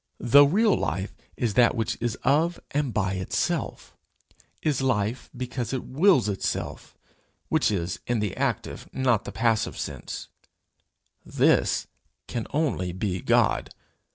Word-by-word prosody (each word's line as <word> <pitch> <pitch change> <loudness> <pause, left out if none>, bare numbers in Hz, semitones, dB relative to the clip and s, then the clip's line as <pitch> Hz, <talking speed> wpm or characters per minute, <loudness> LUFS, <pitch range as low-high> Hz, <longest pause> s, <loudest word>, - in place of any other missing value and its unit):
The 140 +4 +7
real 210 +7 +3
life 95 +7 -2 0.2
is 115 -4 0
that 120 +3 +4
which 115 -2 -1
is 120 -2 -1
of 160 +5 +2
and 145 -3 0
by 95 -4 0
itself 95 -1 -2 0.7
is 145 -4 +1
life 125 -2 -1
because 125 -1 -4
it 130 - -2
wills 155 - +3
itself 100 -2 -3 0.5
which - - +2
is, 90 -4 -2
in 120 - +1
the 105 -3 -2
active, - - -3
not 125 -5 +1
the - - -5
passive 115 -1 0
sense: - - -6 0.9
this - - +2 0.4
can 115 -2 -4
only 140 - 0
be 95 -1 -2
God. - - +2
120 Hz, 130 wpm, -26 LUFS, 105-135 Hz, 0.9 s, The